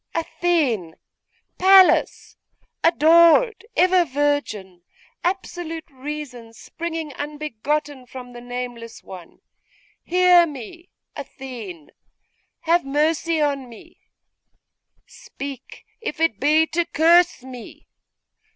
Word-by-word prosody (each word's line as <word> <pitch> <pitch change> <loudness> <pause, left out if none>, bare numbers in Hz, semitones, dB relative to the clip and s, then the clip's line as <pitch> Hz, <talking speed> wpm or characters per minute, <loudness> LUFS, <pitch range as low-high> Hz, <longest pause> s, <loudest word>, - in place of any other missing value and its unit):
'Athene! 295 - -1 0.6
Pallas! 380 0 +4 0.5
Adored! 335 - +4
Ever 365 0 +4
Virgin! 265 - -2 0.4
Absolute 350 -3 -4
reason, 260 -4 -8
springing 325 +5 -6
unbegotten 290 -1 -4
from 250 -1 -10
the 240 - -10
nameless 245 -2 -7
One! 180 -3 -12 0.6
Hear 360 -1 +5
me! 300 +5 -10 0.3
Athene! 240 - -9 0.7
Have 340 +1 +2
mercy 310 +3 0
on 280 -4 -1
me! 230 - -16 1.1
Speak, 275 -2 -10 0.2
if 445 -9 -5
it 325 -11 +1
be 305 +3 +3
to 330 +2 -1
curse 340 -2 +3
me! 255 -2 -11
295 Hz, 85 wpm, -22 LUFS, 250-335 Hz, 1.1 s, Hear